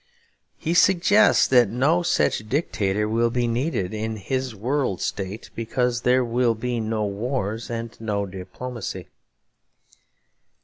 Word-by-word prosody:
He 165 Hz, -, -2 dB
suggests 190 Hz, +4 st, +5 dB
that 125 Hz, -5 st, +5 dB
no 140 Hz, -, +2 dB
such 170 Hz, -10 st, 0 dB
dictator 105 Hz, -, 0 dB
will 115 Hz, +2 st, +2 dB
be 120 Hz, +1 st, 0 dB
needed 115 Hz, -, -1 dB
in 110 Hz, +1 st, -3 dB
his 130 Hz, +4 st, -3 dB
World 125 Hz, -1 st, -1 dB
State 100 Hz, +2 st, -4 dB
because 120 Hz, +1 st, -1 dB
'there 125 Hz, +1 st, +3 dB
will 120 Hz, 0 st, +1 dB
be 120 Hz, +1 st, -2 dB
no 110 Hz, -1 st, -1 dB
wars 110 Hz, +1 st, -3 dB
and 115 Hz, -1 st, -5 dB
no 105 Hz, -2 st, -1 dB
diplomacy.' 100 Hz, +6 st, -7 dB
115 Hz, 125 wpm, -24 LUFS, 110-130 Hz, -, suggests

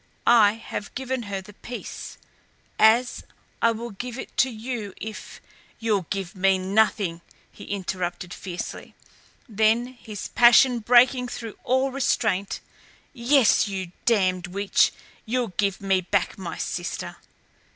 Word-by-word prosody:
I 220 Hz, -4 st, +6 dB
have 220 Hz, -2 st, -7 dB
given 260 Hz, 0 st, -2 dB
her 195 Hz, -1 st, -3 dB
the 205 Hz, +2 st, -14 dB
peace 240 Hz, +4 st, -8 dB, 0.6 s
as 230 Hz, +3 st, +4 dB, 0.4 s
I 230 Hz, -, +5 dB
will 230 Hz, +1 st, -5 dB
give 245 Hz, +5 st, -6 dB
it -, -, -8 dB
to 260 Hz, -, +4 dB
you 225 Hz, -3 st, -5 dB
if 220 Hz, 0 st, -8 dB, 0.2 s
" -, -, -30 dB
"You'll 210 Hz, -6 st, 0 dB
give 195 Hz, -1 st, -3 dB
me 190 Hz, 0 st, +3 dB
nothing," 190 Hz, -2 st, +1 dB, 0.3 s
he -, -, -12 dB
interrupted 180 Hz, -2 st, -4 dB
fiercely; 180 Hz, -2 st, -7 dB, 0.5 s
then, 220 Hz, +1 st, +2 dB
his 220 Hz, -5 st, -8 dB
passion 240 Hz, +1 st, +6 dB
breaking 250 Hz, +2 st, +4 dB
through 230 Hz, -2 st, -7 dB
all 260 Hz, +2 st, +1 dB
restraint 215 Hz, -7 st, 0 dB, 0.5 s
"Yes, 240 Hz, -2 st, +4 dB
you 190 Hz, -3 st, -4 dB, 0.2 s
damned 185 Hz, -6 st, +2 dB
witch 200 Hz, +2 st, +2 dB, 0.4 s
you'll 245 Hz, 0 st, 0 dB
give 195 Hz, -1 st, +1 dB
me 195 Hz, -1 st, +2 dB
back 185 Hz, +1 st, 0 dB
my 175 Hz, -4 st, -6 dB
sister!" -, -, -4 dB
215 Hz, 130 wpm, -25 LUFS, 195-240 Hz, 0.6 s, I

